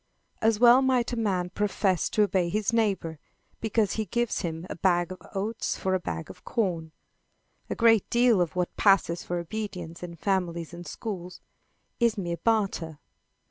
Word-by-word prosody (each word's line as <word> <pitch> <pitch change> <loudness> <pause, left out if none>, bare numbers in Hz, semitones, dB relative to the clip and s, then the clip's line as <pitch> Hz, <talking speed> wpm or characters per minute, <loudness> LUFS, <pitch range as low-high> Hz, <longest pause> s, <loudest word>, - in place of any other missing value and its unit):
As 220 -1 +3
well 245 +2 +7
might 255 -2 +1
a - - 0
man 190 -6 -1
profess 195 -3 0
to 215 - +3
obey 185 -3 +1
his 210 +4 0
neighbor, 195 -8 0 0.4
because 220 -2 +1
he 220 - -2
gives 240 +4 -1
him 165 -2 -4
a - - -6
bag 175 0 +1
of 185 - -8
oats 215 +4 -2
for 190 - -1
a 185 - +2
bag 80 - -5
of 95 - -13
corn. 175 -8 -1 0.8
A - - -2
great 225 -3 +4
deal 235 -5 +4
of 175 -1 -1
what 180 -1 -1
passes 195 -4 +3
for 175 - -3
obedience 175 -2 -5
in 175 -1 -7
families 170 -2 -1
and 175 0 -9
schools, 180 -5 -6 0.6
is 235 -3 +2
mere 170 -3 -2
barter. 195 -9 0
190 Hz, 170 wpm, -27 LUFS, 175-220 Hz, 0.8 s, well